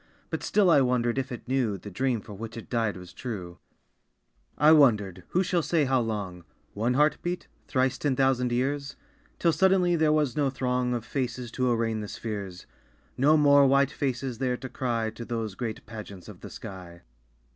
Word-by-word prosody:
But - - -2
still 200 -4 +3
I 145 - +6
wondered 125 -1 +1
if 130 0 -4
it 120 - -7
knew 125 -6 0
The 105 +3 -10
dream 125 +3 0
for 105 - -11
which 115 +3 -7
it 115 - -10
died 115 -5 0
was 90 -1 -11
true. 95 -8 -6 1.0
I 150 +1 +6
wondered 105 - +4
who 185 - +1
shall 175 -1 +1
say 160 -2 +1
how 130 -1 +2
long? 100 -6 -4 0.3
(One 115 +4 0
heart 150 +2 +3
beat? 175 +1 -4 0.2
Thrice 130 -1 +1
ten 140 -3 0
thousand 125 -2 +2
years?) 140 +3 -1 0.4
Till 170 - +3
suddenly 180 +1 +3
there 155 -2 +3
was 150 -5 +1
no 145 -2 +2
throng 125 -1 -1
Of 120 -1 -4
faces 125 -2 -3
to 130 +1 0
arraign 115 -1 0
the 105 - -5
spheres, 100 -5 -6 0.5
No 150 +4 +4
more 145 -2 +6
white 140 +1 +3
faces 130 -4 -3
there 125 -2 0
to 130 - -8
cry 115 -4 -2
To 115 - -8
those 115 -3 -3
great 110 +1 -5
pageants 105 -4 -9
of - - -11
the - - -8
sky. 90 -3 -10
125 Hz, 190 wpm, -27 LUFS, 110-140 Hz, 1.0 s, I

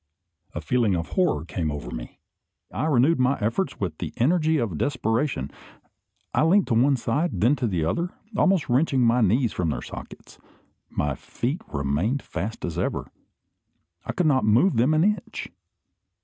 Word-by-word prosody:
A 85 - -3
feeling 110 +3 +1
of 85 -1 -3
horror 170 - +1
came 85 -2 -2
over 70 -5 -5
me. - - -7 0.5
I 155 - -1
renewed 145 +2 +3
my 130 +2 +2
efforts 115 - -1
with 90 -6 -3
the - - -5
energy 160 +4 +2
of 105 - -2
desperation. 115 - -1 0.8
I - - +2
leant 180 +5 +4
to - - +2
one 135 +5 +4
side, 135 +8 -1
then 120 +7 +4
to 125 -2 0
the 85 -6 -1
other, 170 - -1 0.3
almost 190 -5 +2
wrenching 135 +1 +2
my 120 +1 +4
knees 115 +3 +2
from 85 -3 -1
their - - -3
sockets. - - -10 0.5
My 75 -1 -1
feet 130 - -4
remained 75 - -1
fast 110 +3 -5
as 85 0 -4
ever. - - -2 0.9
I - - -3
could 180 - 0
not 135 -4 +3
move 115 - +3
them 130 +7 +3
an 155 - +3
inch. 210 +2 -1
120 Hz, 165 wpm, -25 LUFS, 90-150 Hz, 0.9 s, leant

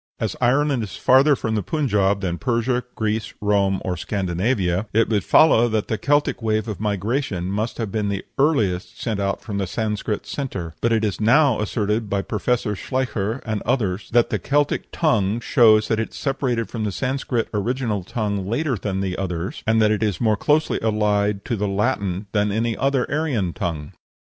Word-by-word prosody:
As - - -2
Ireland 135 +1 +2
is 105 - -6
farther 135 +3 +5
from 110 -3 -3
the 105 - 0
Punjab 100 - +1
than 85 -3 -2
Persia, 125 0 0
Greece, 110 +1 -2
Rome, 100 -2 +1
or 90 - -1
Scandinavia, 95 +1 -1
it 115 +1 +3
would 105 -3 +1
follow 120 -7 +5
that 110 -2 -1
the 110 - -1
Celtic 145 -2 +1
wave 110 -1 0
of 105 -4 -5
migration 105 -2 -1
must 110 +3 -2
have 110 -4 -3
been 105 -1 -1
the 100 -1 -3
earliest 110 - +1
sent 110 -4 -2
out 100 0 -1
from 100 -3 -4
the 95 - -1
Sanscrit 105 +1 -2
centre; 100 - -5
but 115 - +1
it 110 -1 +2
is 105 0 -3
now 130 +2 +4
asserted 105 0 -1
by 100 -1 0
Professor 110 0 -1
Schleicher 115 0 -2
and 110 -2 -2
others 105 -6 -1
that 120 0 +3
the - - 0
Celtic 145 +1 0
tongue 110 - +1
shows 110 -3 +4
that 110 - 0
it 110 - -4
separated 130 -5 -1
from 115 -2 -4
the 105 - -1
Sanscrit 130 0 -1
original 110 -1 -1
tongue 100 -1 -2
later 130 +5 0
than 95 -1 -3
the 95 -2 -2
others, 90 -1 -4
and 110 0 +3
that 105 - +4
it 105 - 0
is 105 -5 0
more 110 -2 +2
closely 150 +8 +1
allied 105 -2 +1
to 120 - -1
the 105 -1 -1
Latin 100 -2 -1
than 105 -1 +1
any 115 +2 0
other 135 -2 +1
Aryan 135 - 0
tongue. 75 -4 -4
110 Hz, 185 wpm, -22 LUFS, 100-120 Hz, -, farther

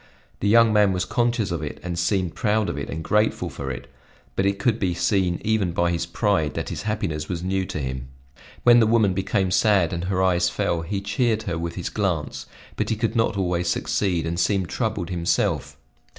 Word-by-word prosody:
The 100 - 0
young 115 0 +6
man 105 -2 +4
was 90 0 -1
conscious 120 -5 0
of 85 -3 -2
it 75 - -5
and 90 -1 -3
seemed 90 0 0
proud 110 -2 +1
of - - -4
it - - -5
and 80 0 -4
grateful 105 +6 +1
for 70 - -5
it; 65 0 -5 0.5
but 95 - +1
it 100 0 0
could 115 -2 +1
be 90 -3 0
seen 90 -2 +1
even 105 -5 +1
by 85 0 +1
his 85 0 -2
pride 85 -6 0
that - - -3
his - - -4
happiness 100 -8 -3
was 85 -1 -3
new 95 0 -1
to - - -5
him. 65 -2 -4 0.6
When 120 0 +7
the 110 - +4
woman 110 -4 +3
became 95 0 0
sad 95 -4 +3
and 85 +1 -3
her 95 0 0
eyes 90 -2 +3
fell, 85 -1 -1
he 95 +4 -3
cheered 110 +2 0
her 85 -6 -3
with 85 0 -4
his 90 - -3
glance; 90 -8 -2 0.3
but - - -1
he 110 - +1
could 115 +2 -1
not 115 -3 +1
always 90 -2 0
succeed, 85 -1 0
and 85 +1 -2
seemed 95 +1 +1
troubled 110 -6 -2
himself. 85 -1 0
95 Hz, 210 wpm, -24 LUFS, 85-105 Hz, 0.6 s, When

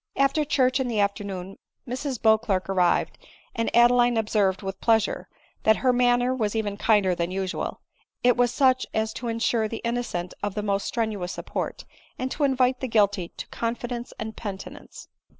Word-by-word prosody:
After 275 +3 +2
church 260 -2 +2
in 260 - 0
the 225 -3 -1
afternoon 200 -2 -2 0.3
Mrs 255 0 -3
Beauclerc 220 -4 +2
arrived, 180 -2 +1 0.3
and 230 0 -1
Adeline 240 0 +5
observed, 205 -4 +1
with 195 0 -5
pleasure, 225 -2 +1 0.3
that 220 - +4
her 255 - +5
manner 245 +1 +3
was 220 -4 -1
even 210 -2 -1
kinder 205 -3 +3
than 170 0 -2
usual; 190 0 -3 0.4
it 245 0 +5
was 245 -1 +2
such 255 -1 +3
as 220 0 0
to 240 - -5
insure 230 -1 +1
the 225 - -5
innocent 235 -7 -2
of 205 -1 -3
the 210 - -2
most 200 -1 -1
strenuous 210 -6 -2
support, - - -5 0.3
and 260 +1 -3
to 295 - -2
invite 255 -1 +2
the 260 - -3
guilty 205 -5 +2
to - - -5
confidence 240 +1 -4
and 220 0 -5
penitence. 200 -3 -8
225 Hz, 170 wpm, -25 LUFS, 200-245 Hz, 0.4 s, Adeline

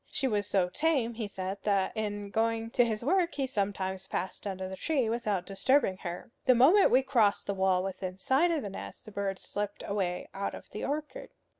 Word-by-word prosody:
She 270 - -1
was 205 -4 0
so 190 -3 +2
tame, 265 - +1
he 225 -2 -4
said, 190 0 -4
that 200 -1 +1
in 205 -2 -3
going 225 +1 0
to 245 - +4
his 225 -1 -2
work 350 +2 +2
he 275 - 0
sometimes 195 -5 -2
passed 190 +2 -4
under 190 -1 -4
the 190 - -6
tree 265 0 0
without 210 -6 -1
disturbing 195 +1 +2
her. 175 +3 -6
The 255 - +6
moment 320 - +6
we 260 +1 +4
crossed 230 -7 +2
the 200 - -1
wall 190 -1 +2
within 185 -1 -4
sight 270 - +3
of 325 -6 0
the 205 - -4
nest, - - -8
the 215 - -10
bird 200 -1 -2
slipped 205 +1 -4
away 190 -3 -2
out 200 +1 -3
of - - -12
the 210 - -5
orchard. 300 +1 -4
205 Hz, 205 wpm, -30 LUFS, 190-255 Hz, -, The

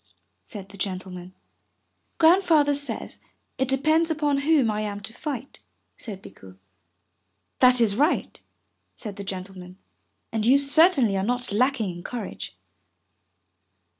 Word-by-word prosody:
said 195 -4 -10
the 200 -1 -14
Gentleman. 185 -2 -5 0.9
"Grandfather 325 -4 +5
says 285 0 -5 0.4
it 265 - +1
depends 310 +5 +2
upon 295 -3 +1
whom 280 -5 +3
I 210 0 -2
am 205 -1 -4
to 220 +2 -8
fight," 275 -1 -6 0.4
said 200 -4 -9
Bikku. 95 -1 -14 1.0
"That 250 -1 +6
is 220 -4 +3
right," 295 +8 0 0.5
said 210 -4 -8
the 200 - -6
gentleman, 185 -1 -8 0.5
"and 220 -1 -1
you 255 +5 +6
certainly 280 - +4
are 190 - -1
not 245 +2 -2
lacking 235 -2 +1
in 175 - -9
courage." 215 - -6
240 Hz, 125 wpm, -25 LUFS, 195-285 Hz, 1.0 s, That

